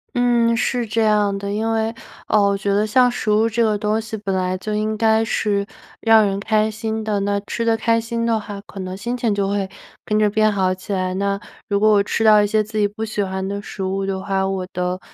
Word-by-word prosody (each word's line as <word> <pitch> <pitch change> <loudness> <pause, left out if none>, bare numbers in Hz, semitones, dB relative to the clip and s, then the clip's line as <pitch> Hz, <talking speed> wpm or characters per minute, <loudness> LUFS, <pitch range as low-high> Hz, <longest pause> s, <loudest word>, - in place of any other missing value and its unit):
嗯， 240 -1 +3
是 240 0 0
这 225 +1 0
样 210 -2 +2
的。 200 0 -4
因 220 +2 -1
为， 225 0 0 0.3
呃， 215 - +3
我 200 0 +2
觉 200 0 -1
得 205 +2 +2
像 250 +3 +4
食 240 -3 -3
物 215 +2 +3
这 230 +1 +1
个 215 -2 +2
东 210 +1 0
西， 220 0 -6
本 200 -2 -3
来 185 0 -1
就 210 +3 -4
应 215 +1 -1
该 220 0 +3
是 205 -2 0 0.4
让 225 -1 +5
人 195 -1 -1
开 215 +1 +1
心 220 0 -3
的。 210 -2 -1
那 200 0 0
吃 230 +3 -4
得 230 -1 +2
开 230 0 +1
心 230 0 -3
的 230 -1 +1
话， 205 -1 -7
可 200 -1 -12
能 185 0 -5
心 235 +5 -3
情 230 -3 0
就 200 -1 0
会 200 -1 -1 0.4
跟 210 - 0
着 215 0 +4
变 215 +1 +2
好 190 -2 +1
起 185 +2 -9
来。 185 -1 -1
那， 200 0 -1 0.3
如 200 -1 +1
果 215 +1 +4
我 205 -1 +5
吃 225 - -1
到 215 -1 +7
一 205 - +2
些 215 +1 +2
自 215 +1 -7
己 205 - +3
不 220 +2 -5
喜 215 -1 -2
欢 190 0 -3
的 200 +1 -4
食 195 - -7
物 190 +1 -1
的 195 -1 -2
话， 195 -1 -1
我 190 -1 -2
的 180 0 -2
210 Hz, 270 characters per minute, -20 LUFS, 200-220 Hz, 0.4 s, 到